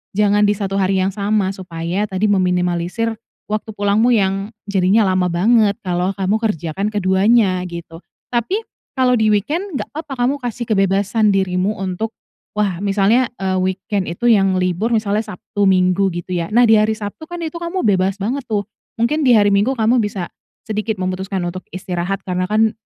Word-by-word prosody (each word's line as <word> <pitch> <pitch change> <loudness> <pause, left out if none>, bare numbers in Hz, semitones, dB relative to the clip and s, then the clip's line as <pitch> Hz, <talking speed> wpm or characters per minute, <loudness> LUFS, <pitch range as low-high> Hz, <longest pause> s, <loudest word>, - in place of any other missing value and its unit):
jangan 205 0 +3
di - - +3
satu 195 -1 -3
hari 190 0 +1
yang 190 +1 +1
sama. 205 -1 0
Supaya, 175 +1 -3
tadi, 195 +2 0
meminimalisir 180 +4 0 0.3
waktu 215 +1 -3
pulangmu, 205 +4 +2
yang 195 0 0 0.2
jadinya 200 +2 +3
lama 180 -1 +2
banget, 210 +3 +3
kalau 180 0 0
kamu 195 +2 0
kerjakan 195 -3 -2
keduanya, 190 0 +2
gitu. 170 -1 -8 0.3
Tapi, 305 - -1 0.4
kalau 250 -1 +4
di 220 -2 +2
weekend, 300 - -1
nggak - - -5
papa 310 -2 -5
kamu 275 - +1
kasih 240 0 -3
kebebasan 200 +1 +2
dirimu 190 +1 0
untuk, 195 +4 -3 0.4
wah, 195 -4 0
misalnya, 205 +5 +3
eee, 190 -1 0
weekend 190 +1 -2
itu 175 +8 -2
yang 195 -3 +3
libur, 185 +6 0
misalnya 215 0 +1
Sabtu, 205 0 -4
Minggu, 185 0 +3
gitu 175 +1 -4
ya. 170 +3 -3
Nah, 240 +2 +5
di 220 - +6
hari 215 +1 +2
Sabtu 210 +8 -7
kan, 350 - -6
itu 320 +1 -5
kamu 340 +2 -3
bebas 190 0 +1
banget 245 +7 -2
tuh, 210 -2 0 0.4
mungkin 295 +6 +1
di 250 - +6
hari 205 -1 +5
Minggu 205 +7 +2
kamu 235 +1 +2
bisa 200 -4 -3 0.4
sedikit 215 -1 -2
memutuskan 185 0 -2
untuk 180 +2 -4
istirahat, 185 +1 -3
karena 185 0 -1
kan, 220 +1 +3
200 Hz, 170 wpm, -19 LUFS, 185-220 Hz, 0.4 s, di